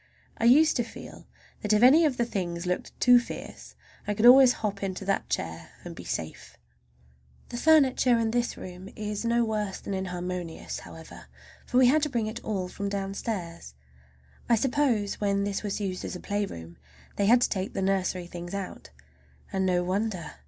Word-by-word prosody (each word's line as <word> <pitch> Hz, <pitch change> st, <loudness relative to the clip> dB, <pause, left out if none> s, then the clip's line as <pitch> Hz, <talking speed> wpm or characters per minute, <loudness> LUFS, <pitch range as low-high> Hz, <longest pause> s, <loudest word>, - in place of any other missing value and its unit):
I 225 Hz, -, +1 dB
used 305 Hz, +7 st, +6 dB
to 240 Hz, -, +1 dB
feel 230 Hz, -, -11 dB, 0.3 s
that 210 Hz, 0 st, +1 dB
if 210 Hz, +2 st, +3 dB
any 300 Hz, +6 st, +7 dB
of 275 Hz, -5 st, 0 dB
the 240 Hz, -, +2 dB
other 235 Hz, -, -7 dB
things 175 Hz, -3 st, -3 dB
looked 180 Hz, 0 st, -3 dB
too 245 Hz, -1 st, +7 dB
fierce 240 Hz, -, -9 dB, 0.3 s
I 210 Hz, -, -1 dB
could 215 Hz, -, +1 dB
always 255 Hz, +1 st, +9 dB
hop 205 Hz, -2 st, -4 dB
into 195 Hz, 0 st, -4 dB
that 195 Hz, 0 st, -1 dB
chair 80 Hz, 0 st, -4 dB
and -, -, -8 dB
be -, -, -9 dB
safe. 80 Hz, -1 st, -6 dB, 0.9 s
The 240 Hz, -, -5 dB
furniture 265 Hz, -4 st, +4 dB
in 225 Hz, -1 st, 0 dB
this 240 Hz, 0 st, -1 dB
room 185 Hz, +1 st, -9 dB
is 210 Hz, 0 st, -4 dB
no 235 Hz, 0 st, +2 dB
worse 210 Hz, -3 st, -3 dB
than 200 Hz, -, -6 dB
inharmonious, 180 Hz, -2 st, -4 dB
however, -, -, -12 dB, 0.4 s
for 250 Hz, -, 0 dB
we 255 Hz, -, +7 dB
had 295 Hz, +5 st, +4 dB
to 300 Hz, -, 0 dB
bring 235 Hz, -5 st, -1 dB
it 220 Hz, +1 st, -6 dB
all 195 Hz, -4 st, -2 dB
from 200 Hz, +2 st, -4 dB
downstairs. 195 Hz, -, -5 dB, 0.7 s
I 235 Hz, -, +6 dB
suppose 240 Hz, -5 st, 0 dB
when 200 Hz, -1 st, +1 dB
this 200 Hz, -1 st, -2 dB
was 205 Hz, -1 st, -3 dB
used 190 Hz, -3 st, -3 dB
as -, -, -5 dB
a -, -, -6 dB
playroom 85 Hz, -, -4 dB, 0.4 s
they 200 Hz, -, +2 dB
had 240 Hz, +3 st, +6 dB
to -, -, +2 dB
take 190 Hz, -1 st, -3 dB
the -, -, -1 dB
nursery 190 Hz, -2 st, 0 dB
things 175 Hz, +2 st, -7 dB
out, 195 Hz, -2 st, -6 dB, 0.6 s
and 190 Hz, 0 st, +1 dB
no 180 Hz, -1 st, +2 dB
wonder! 185 Hz, -1 st, -2 dB
205 Hz, 190 wpm, -27 LUFS, 185-235 Hz, 0.9 s, always